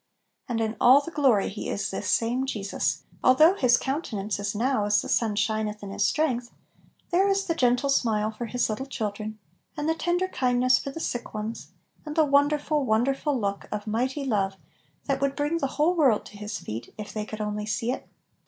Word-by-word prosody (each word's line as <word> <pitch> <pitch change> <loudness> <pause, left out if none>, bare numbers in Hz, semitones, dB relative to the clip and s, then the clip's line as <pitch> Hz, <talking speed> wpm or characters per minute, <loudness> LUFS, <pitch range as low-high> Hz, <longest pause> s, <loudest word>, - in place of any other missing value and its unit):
And 235 -2 -1
in 220 0 -1
all 260 +4 +7
the 335 - -8
glory 265 -10 +3
He 205 - -5
is 200 -1 -2
"this 195 - -3
same 245 +3 +1
Je 215 -6 -3
sus 200 - -1
"; - - -28
although 310 +8 +6
His 250 -10 +4
countenance 215 - -3
is 205 0 -2
now 235 -1 +1
as 205 0 +3
the - - -4
sun 220 -4 +1
shineth 210 0 -1
in 195 - -6
his 200 - 0
strength* 250 -3 +1 0.6
there 375 +3 +4
is 390 0 +1
the 335 - 0
gentle 250 -2 +2
smile 220 -5 +1
for 230 +2 -6
His 245 +2 0
little 225 +5 -4
children, 215 -3 -4 0.4
and 295 +1 -2
the 320 - +3
tender 350 +3 0
kindness 255 -5 +2
for - - -5
the 275 - -7
sick 240 -7 -4
ones, 215 +2 -5 0.4
and 300 -1 -6
the 320 -2 +4
wonderful, 290 +1 +2
won 220 -2 +2
derful 275 +1 0
look 200 -2 -3
of 210 0 -4
mighty 255 +6 -1
love 195 -6 0 0.5
that 275 -1 -1
would 275 0 +1
bring 300 +3 0
the 275 - 0
whole 310 +4 +3
world 275 -11 +3
to 205 - -12
His 210 +1 -5
feet 115 +2 -7
if 210 -1 -7
they 215 - -2
could 215 0 -7
only 210 0 -3
see 230 +2 -1
it. - - -6
245 Hz, 210 wpm, -26 LUFS, 210-280 Hz, 0.6 s, all